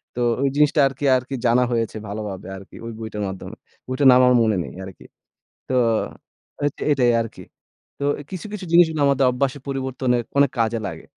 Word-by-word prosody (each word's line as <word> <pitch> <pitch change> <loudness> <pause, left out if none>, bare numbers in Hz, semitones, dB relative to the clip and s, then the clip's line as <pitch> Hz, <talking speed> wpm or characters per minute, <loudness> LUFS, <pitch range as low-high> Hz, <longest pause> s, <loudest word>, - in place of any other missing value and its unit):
তো - - -4 0.2
ওই 140 - +2
জিনিসটা 150 0 +3
আরকি, 135 +2 -5
আরকি 130 +2 -5
জানা 120 +1 +4
হয়েছে 115 -2 -1
ভালোভাবে 100 -2 -6
আরকি 95 - -14
ওই 115 - -5
বইটার 110 -2 -5
মাধ্যমে। 95 -1 -8 0.3
বইটার 130 +2 +2
নাম 125 - +6
আমার 125 - +5
মনে 110 -3 +1
নেই - - -9
আরকি। 95 - -12 0.6
তো 130 - -1 0.9
এতে 145 - -4
এটাই 125 -4 +3
আরকি। 115 - -9 0.6
তো 140 - -3 0.3
কিছু, 185 +1 -6
কিছু 205 -3 -6
জিনিসগুলো 160 -3 +4
আমাদের 140 -1 +3
অভ্যাস 130 +2 -1
পরিবর্তনে 130 -2 -1 0.2
অনেক 140 -2 +5
কাজে 115 0 +1
লাগে। - - -9
125 Hz, 170 wpm, -22 LUFS, 115-140 Hz, 0.9 s, নাম